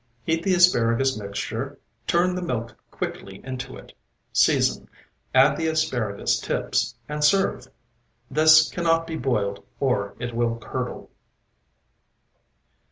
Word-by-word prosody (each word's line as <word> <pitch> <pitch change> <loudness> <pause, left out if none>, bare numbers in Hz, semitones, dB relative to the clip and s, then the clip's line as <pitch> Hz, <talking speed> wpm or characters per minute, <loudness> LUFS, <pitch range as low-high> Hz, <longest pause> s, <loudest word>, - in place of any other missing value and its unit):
Heat 165 0 0
the 185 +1 +2
asparagus 135 -7 +3
mixture, 100 -2 -5 0.3
turn 175 +1 +2
the 180 - -3
milk 115 -9 -3
quickly 95 0 -6
into 130 0 -6
it, - - -14 0.4
season, - - +2 0.4
add - - +5
the 160 - -1
asparagus 130 -10 0
tips, - - -1
and 150 0 -3
serve. 150 -6 +2 0.6
This 155 +3 +6
cannot 165 -1 +1
be 165 - -5
boiled 100 -9 -1 0.2
or 105 -7 0
it 120 -1 -4
will 115 0 0
curdle. 115 - -6
135 Hz, 115 wpm, -24 LUFS, 115-165 Hz, 0.6 s, This